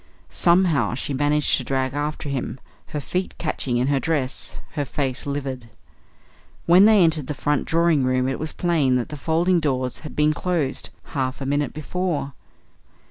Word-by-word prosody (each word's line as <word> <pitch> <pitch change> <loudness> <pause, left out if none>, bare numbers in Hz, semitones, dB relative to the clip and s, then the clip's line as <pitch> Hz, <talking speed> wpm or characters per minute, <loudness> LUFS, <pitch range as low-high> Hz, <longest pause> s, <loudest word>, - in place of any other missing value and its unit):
Somehow 170 - +3
she 140 - -3
managed 145 +2 +2
to - - -3
drag 130 -1 -1
after 150 +1 -3
him, 135 -1 -3 0.3
her 150 - -4
feet 180 +6 -3
catching 135 -6 -1
in 125 - +1
her 140 -1 +2
dress, 140 -4 -2
her 145 - -2
face 135 -1 -2
livid. 135 -4 -4 1.0
When 180 +4 +7
they 215 -3 +6
entered 155 -5 +2
the 150 - -3
front 145 +2 0
drawing 165 -3 +2
room 130 0 +1
it 135 - -2
was 155 0 -3
plain 155 -7 +1
that 125 -2 -1
the 150 - -6
folding 165 +6 +2
doors 130 -5 -1
had 155 - -9
been 150 0 +3
closed 155 -4 -2
half 130 -3 -3
a 135 - -4
minute 145 0 0
before. 155 -2 -2
145 Hz, 170 wpm, -23 LUFS, 130-160 Hz, 1.0 s, When